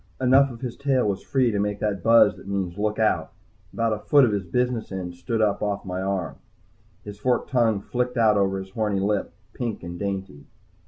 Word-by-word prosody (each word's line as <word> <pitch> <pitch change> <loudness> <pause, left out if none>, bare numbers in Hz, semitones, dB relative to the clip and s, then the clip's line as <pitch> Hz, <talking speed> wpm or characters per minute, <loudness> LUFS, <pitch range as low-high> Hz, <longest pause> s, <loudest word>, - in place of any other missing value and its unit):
Enough 135 +2 +5
of 115 -2 -10
his 125 -2 -4
tail 135 -5 +1
was 100 -2 -1
free 130 -4 +1
to 105 - -1
make 105 0 -1
that 100 -3 -1
buzz 115 -1 +5
that - - -14
means 95 -3 -2
"Look 105 +1 -1
out!" 110 -1 +1 0.4
About 115 -1 0
a 105 - -3
foot 140 +5 +5
of 115 - 0
his 100 -2 -1
business 125 +5 -1
end 90 -2 -5
stood 110 +6 -1
up 105 -2 +1
off 100 -1 -2
my 90 0 -3
arm. 95 -7 -2 0.7
His 105 -1 -9
forked 125 +2 0
tongue 115 -5 +2
flicked 125 +3 -2
out 110 -2 +4
over 95 -1 +1
his 95 0 -7
horny 105 -2 -1
lip, 100 +1 -1 0.2
pink 120 -6 -4
and 85 0 -7
dainty. 95 -7 -5
105 Hz, 210 wpm, -24 LUFS, 95-120 Hz, 0.7 s, Enough